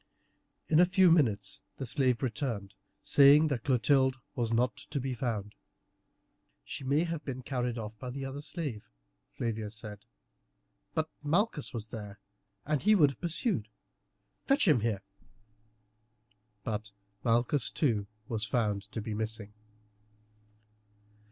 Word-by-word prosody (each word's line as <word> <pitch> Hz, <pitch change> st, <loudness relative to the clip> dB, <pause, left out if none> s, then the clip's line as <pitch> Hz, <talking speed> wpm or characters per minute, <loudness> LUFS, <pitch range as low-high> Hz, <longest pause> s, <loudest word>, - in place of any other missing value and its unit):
In 155 Hz, -, +4 dB
a 180 Hz, -, +8 dB
few 185 Hz, -1 st, +5 dB
minutes 105 Hz, -, +2 dB, 0.2 s
the 135 Hz, -, -4 dB
slave 130 Hz, 0 st, +1 dB
returned, 110 Hz, -5 st, -2 dB, 0.3 s
saying 145 Hz, +2 st, +7 dB
that 125 Hz, -6 st, -2 dB
Clotilde 130 Hz, 0 st, +3 dB, 0.2 s
was 120 Hz, -4 st, -1 dB
not 120 Hz, +2 st, +2 dB
to 145 Hz, -, -4 dB
be 130 Hz, 0 st, -2 dB
found. 110 Hz, -5 st, -3 dB, 1.1 s
"She 95 Hz, -, -6 dB
may 140 Hz, +5 st, +2 dB
have 165 Hz, -3 st, -3 dB
been 130 Hz, -2 st, -5 dB
carried 125 Hz, -2 st, -2 dB
off 110 Hz, -1 st, -5 dB
by 125 Hz, -, -5 dB
the 135 Hz, +2 st, -5 dB
other 135 Hz, +2 st, -5 dB
slave," 145 Hz, -, -4 dB, 0.4 s
Flavia 110 Hz, -2 st, -3 dB
said, 105 Hz, -1 st, -8 dB, 1.0 s
"but 160 Hz, 0 st, +1 dB
Malchus 160 Hz, +2 st, 0 dB
was 110 Hz, -2 st, -6 dB
there, 105 Hz, -2 st, -7 dB, 0.5 s
and 150 Hz, -1 st, 0 dB
would 190 Hz, -9 st, +6 dB
have 130 Hz, -, -15 dB
pursued. 170 Hz, -, -1 dB, 0.8 s
Fetch 275 Hz, -4 st, +4 dB
him 150 Hz, -7 st, +6 dB
here." 105 Hz, -3 st, -1 dB, 1.6 s
But 105 Hz, -1 st, -3 dB, 0.3 s
Malchus 120 Hz, +3 st, +2 dB
too 110 Hz, -9 st, 0 dB, 0.2 s
was 110 Hz, -2 st, -2 dB
found 105 Hz, -3 st, -1 dB
to 110 Hz, -, -3 dB
be 110 Hz, +1 st, -4 dB
missing. 110 Hz, -1 st, -4 dB
125 Hz, 130 wpm, -31 LUFS, 110-145 Hz, 1.6 s, a